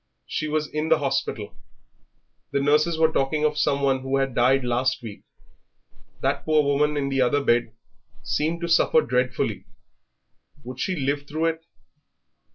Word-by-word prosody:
She 155 - -3
was 155 0 -1
in 150 +1 -3
the - - +5
hospital.... 135 -7 -2 1.0
The - - 0
nurses 150 +4 +2
were 160 0 +3
talking 150 +2 0
of 150 0 +1
some 140 -1 +1
one 135 -1 +2
who 135 +1 -1
had 135 -1 -1
died 130 +3 +3
last 125 +2 0
week.... 110 -3 -8 1.0
That 140 +1 0
poor 155 -1 +3
woman 145 +1 +1
in 140 -1 -1
the 135 -1 0
other 140 +3 +2
bed 120 -3 +1 0.5
seemed 165 +3 -1
to 170 - -2
suffer 180 - +4
dreadfully. - - -1 1.0
Would 125 +1 -9
she 185 - -1
live 145 -1 -2
through 155 +3 -2
it? 165 0 -2
140 Hz, 160 wpm, -24 LUFS, 135-155 Hz, 1.0 s, the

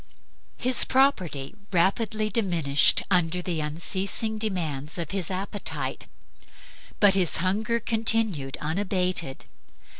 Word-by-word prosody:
His 255 0 +6
property 185 - 0 0.2
rapidly 215 +4 0
diminished 170 -10 +2
under 180 -1 +2
the 175 -2 -3
unceasing 190 +8 -2
demands 165 -9 -3
of 170 -3 -4
his 190 -4 -3
appetite, 195 +2 -5 0.9
but 205 -2 +5
his 185 -4 +3
hunger 215 +7 -1
continued 220 - +1
unabated. 180 -3 -2
185 Hz, 95 wpm, -25 LUFS, 165-215 Hz, 0.9 s, His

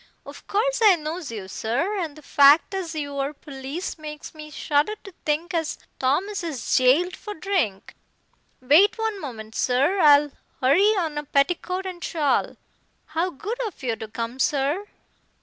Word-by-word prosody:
Of - - -12
course 475 +4 0
I 410 -4 +8
knows 315 -2 -5
you, 205 -4 -6
sir, 275 - -2
and 320 -5 -4
the 305 - -14
fact 285 +7 +5
as 355 -4 -4
you 285 -2 -4
are 275 +2 -1
police 285 +5 -6
makes 300 -1 -8
me 305 -1 -10
shudder 300 +6 0
to 390 - -11
think 315 +4 -1
as 325 -2 -1 0.2
Thomas 360 +10 0
is 295 -9 -2
jailed 295 +9 +4
for 420 - -8
drink. 315 - -2 0.7
Wait 315 - +5
one 445 -3 -2
moment, 220 -6 -8
sir. 275 - +1
I'll 295 -2 +6 0.3
hurry 375 +12 +4
on 315 -5 -1
a - - -5
petticoat 355 +6 0
and 360 -3 -6
shawl. 300 -4 0 0.6
How 335 +3 +1
good 420 - -6
of 380 - -11
you 235 -3 0
to 220 - -7
come, 230 +3 -5
sir." 295 +7 0
305 Hz, 165 wpm, -24 LUFS, 275-370 Hz, 0.7 s, I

